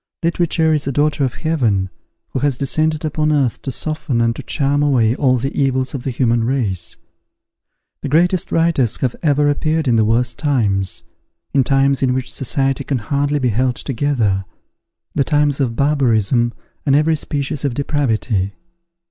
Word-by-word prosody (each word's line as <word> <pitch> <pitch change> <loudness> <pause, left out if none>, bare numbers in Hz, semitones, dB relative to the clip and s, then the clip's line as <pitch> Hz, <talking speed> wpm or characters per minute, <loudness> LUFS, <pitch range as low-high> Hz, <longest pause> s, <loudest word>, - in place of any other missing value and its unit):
Literature 165 -1 +1
is 150 -3 -1
a - - 0
daughter 145 +1 +1
of 130 -2 -1
Heaven 115 - 0 0.4
who - - -3
has 140 -1 0
descended 155 +3 0
upon 155 0 0
earth 140 -6 +1
to - - -5
soften 150 -2 -1
and 115 0 +1
to - - -6
charm 140 +1 0
away 125 -6 +3
all 130 -3 +2
the 135 +3 -3
evils 130 -1 0
of 135 - -4
the 135 - -3
human 120 -2 +1
race. 100 -10 -1 1.1
The 145 - -4
greatest 175 +4 +2
writers 165 -8 +2
have 125 -3 0
ever 145 -2 +2
appeared 155 +1 0
in 120 -2 +3
the 110 - +4
worst 120 +4 +1
times, 105 - 0 0.5
in 135 - +4
times 135 +1 +2
in 130 -1 +2
which 130 0 -3
society 135 +1 -1
can 135 -1 -1
hardly 140 +5 -1
be 130 -3 +1
held 125 +3 0
together, 115 -9 -1 0.7
the 140 - +2
times 145 -1 +1
of 125 -5 0
barbarism 120 -4 +2 0.3
and 140 -2 +2
every 155 +2 +3
species 145 -1 -3
of 140 -4 -1
depravity. 115 -9 -1
135 Hz, 165 wpm, -18 LUFS, 120-145 Hz, 1.1 s, the